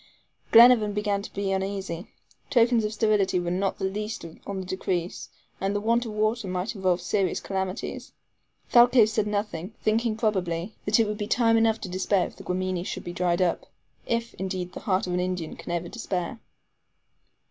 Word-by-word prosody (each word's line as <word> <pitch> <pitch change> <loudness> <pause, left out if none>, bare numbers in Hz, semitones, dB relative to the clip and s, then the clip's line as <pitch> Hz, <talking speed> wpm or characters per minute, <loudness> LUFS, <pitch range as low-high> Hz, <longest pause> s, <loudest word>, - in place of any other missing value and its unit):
Glenarvan 230 -3 +7
began 205 -1 0
to - - -9
be 200 -1 -2
uneasy. 190 -2 -3 0.4
Tokens 240 -3 +4
of 210 - -1
sterility 210 -4 +2
were 175 0 -2
not 190 +2 0
the - - -2
least 210 +1 -4 0.2
on 200 -1 -3
the 190 - -5
decrease, 180 -1 -3 0.3
and 195 +1 -1
the - - +1
want 230 +3 +1
of 215 - -6
water 215 0 0
might 185 +3 -2
involve 185 -4 +1
serious 190 0 0
calamities. 190 +1 -4 0.6
Thalcave 240 -2 +7
said 215 -1 0
nothing, 205 -2 -3
thinking 220 0 +1
probably, 190 -3 -1
that 210 +3 +3
it 225 - +4
would 210 0 -4
be 205 - -2
time 230 -1 +3
enough 225 -1 +3
to - - -4
despair 185 +1 +1
if - - -9
the - - -11
Guamini 185 -1 -2
should - - -5
be 175 - -6
dried 175 0 +1
up 175 - -1 0.4
if, 230 0 -1
indeed, 185 -1 -3
the - - -6
heart 190 -1 0
of 180 - -3
an 180 - +1
Indian 180 -3 -3
can - - -8
ever 175 0 -2
despair. 195 -2 -4
200 Hz, 185 wpm, -26 LUFS, 185-220 Hz, 0.6 s, Glenarvan